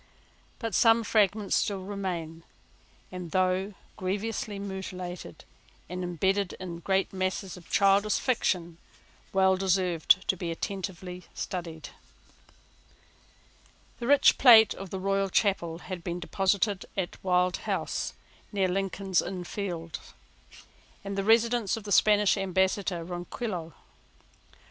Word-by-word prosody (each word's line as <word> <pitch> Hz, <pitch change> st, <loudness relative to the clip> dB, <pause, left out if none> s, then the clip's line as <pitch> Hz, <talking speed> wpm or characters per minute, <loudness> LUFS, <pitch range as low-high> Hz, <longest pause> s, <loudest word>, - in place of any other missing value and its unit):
But 225 Hz, -3 st, -4 dB
some 225 Hz, +3 st, +5 dB
fragments 210 Hz, -1 st, +2 dB
still 195 Hz, -2 st, -1 dB
remain, 180 Hz, -5 st, -4 dB, 0.7 s
and, 180 Hz, -2 st, -6 dB
though 185 Hz, +3 st, 0 dB, 0.2 s
grievously 205 Hz, +2 st, -3 dB
mutilated, 185 Hz, -, -7 dB, 0.4 s
and 180 Hz, +2 st, -5 dB
imbedded 190 Hz, +2 st, 0 dB
in 175 Hz, -2 st, -7 dB
great 190 Hz, +3 st, 0 dB
masses 185 Hz, 0 st, -2 dB
of 180 Hz, -3 st, -14 dB
childish 200 Hz, +1 st, +3 dB
fiction, 175 Hz, -9 st, -1 dB, 0.5 s
well 190 Hz, 0 st, +4 dB
deserve 185 Hz, -3 st, 0 dB
to 190 Hz, +1 st, +4 dB
be 175 Hz, -1 st, -4 dB
attentively 180 Hz, 0 st, -5 dB
studied. 165 Hz, -4 st, -5 dB, 2.1 s
The 240 Hz, -, -4 dB
rich 285 Hz, +1 st, +5 dB
plate 225 Hz, -5 st, +8 dB
of 195 Hz, -1 st, -8 dB
the 190 Hz, -, -4 dB, 0.3 s
Chapel 195 Hz, -5 st, +2 dB
Royal 165 Hz, -, -6 dB
had 185 Hz, -3 st, -7 dB
been 175 Hz, +1 st, -3 dB
deposited 195 Hz, +2 st, 0 dB
at 185 Hz, -2 st, -4 dB
Wild 180 Hz, -1 st, +2 dB
House, -, -, -3 dB, 0.4 s
near 195 Hz, -3 st, +1 dB
Lincoln's 195 Hz, 0 st, 0 dB
Inn 185 Hz, -2 st, -5 dB
Fields, 175 Hz, -3 st, -6 dB, 0.9 s
the 195 Hz, 0 st, -2 dB
residence 230 Hz, -1 st, +3 dB
of 225 Hz, -, -8 dB
the 205 Hz, -, -7 dB
Spanish 210 Hz, 0 st, +4 dB
ambassador 190 Hz, -1 st, 0 dB
Ronquillo. 175 Hz, -, -5 dB
190 Hz, 115 wpm, -28 LUFS, 180-200 Hz, 2.1 s, plate